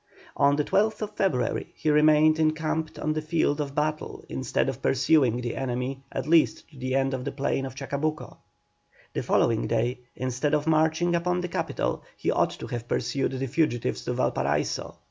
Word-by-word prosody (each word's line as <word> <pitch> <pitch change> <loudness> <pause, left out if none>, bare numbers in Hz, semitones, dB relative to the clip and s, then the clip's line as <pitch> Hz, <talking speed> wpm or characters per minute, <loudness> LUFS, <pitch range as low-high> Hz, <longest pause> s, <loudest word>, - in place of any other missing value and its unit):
On 140 0 +4
the 150 - +1
12th 215 +3 0
February 140 - 0
he 155 - 0
remained 155 +1 +5
encamped 155 0 0
on 155 - -1
the 155 - -2
field 155 -2 +1
of 140 -1 -5
battle 155 0 -2
instead - - -1
of - - -3
pursuing 130 -2 +3
the 120 -1 -3
enemy 130 +1 -3
at 135 - -3
least 165 0 +3
to 145 - -16
the 130 +1 -1
end 135 0 +1
of 130 -1 -3
the - - -3
plain 135 -1 -1
of 130 - -10
Chacabuco. 140 +3 -3 0.8
The - - -1
following 115 -1 +2
day, 120 +2 0 0.2
instead 130 +4 0
of 150 0 -1
marching 160 +2 +2
upon 180 +1 +1
the 180 - -4
capital - - -2 0.2
he - - 0
ought - - +2
to - - -7
have 120 -1 -5
pursued 135 +1 -1
the 135 0 -2
fugitives 120 - 0
to - - -1
Valparaiso. 70 +2 -1
145 Hz, 180 wpm, -26 LUFS, 130-155 Hz, 0.8 s, remained